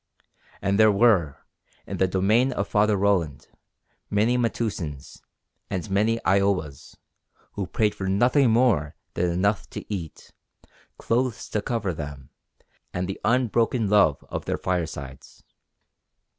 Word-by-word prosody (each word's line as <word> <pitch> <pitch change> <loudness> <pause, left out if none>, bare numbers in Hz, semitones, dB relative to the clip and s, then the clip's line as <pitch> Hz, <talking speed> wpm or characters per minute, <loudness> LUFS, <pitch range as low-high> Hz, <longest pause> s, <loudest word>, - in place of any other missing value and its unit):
And 100 +2 +1
there 110 -1 +7
were, 100 - +2 0.4
in - - -5
the 95 - +2
domain 105 +8 +2
of 100 -3 -2
Father 105 0 +2
Roland, 95 -7 0 0.6
many 110 +4 +2
Metoosins, 105 - -3 0.5
and 95 -4 -3
many 110 +4 +2
I 95 +1 +4
owas, 90 -8 -2 0.6
who 100 -3 -4
prayed 105 -2 +1
for 95 - -5
nothing 120 +7 +3
more 110 -11 +2 0.2
than 90 0 0
enough 100 +5 0
to - - -7
eat, 85 -6 -7 0.7
clothes 120 0 -1
to 105 - -1
cover 105 -5 -2
them, 70 -4 -8 0.6
and 90 +1 -3
the 95 - -6
unbroken 120 -2 +1
love 80 -9 +3
of - - -5
their - - -1
firesides. 80 -7 -5
100 Hz, 130 wpm, -25 LUFS, 85-110 Hz, 0.7 s, there